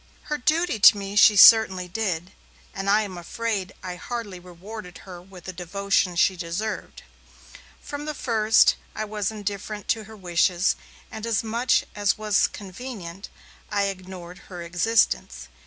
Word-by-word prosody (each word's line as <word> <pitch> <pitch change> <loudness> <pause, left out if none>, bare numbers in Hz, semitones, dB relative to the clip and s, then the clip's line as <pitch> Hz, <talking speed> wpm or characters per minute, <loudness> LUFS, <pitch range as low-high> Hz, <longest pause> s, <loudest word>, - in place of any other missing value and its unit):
Her 300 -1 -3
duty 315 -2 +1
to 205 - +8
me 200 0 -6
she 210 0 +7
certainly 200 -4 +7
did, 180 -3 -3 0.4
and 195 0 -3
I 215 +2 +4
am 185 -4 -7
afraid 200 +1 -3
I 180 -1 -6
hardly 210 -2 -6
rewarded 180 +2 -10
her 180 -2 -10
with 185 -1 -14
the 185 - -7
devotion 185 +1 -1
she 190 +2 +3
deserved. 180 +5 -5 0.8
From 290 0 -6
the 305 0 -4
first, 225 -4 +3 0.2
I 215 - -3
was 210 -2 -2
indifferent 205 -1 -5
to 220 -1 0
her 220 0 -13
wishes, 180 0 +1 0.4
and, 220 - -8
as 230 -2 0
much 230 +2 +1
as 205 -1 +1
was 215 -2 +2
convenient, 195 -3 -9 0.4
I 205 -1 +1
ignored 185 -1 -9
her 175 -3 -7
existence. 170 - 0
200 Hz, 150 wpm, -24 LUFS, 180-220 Hz, 0.8 s, to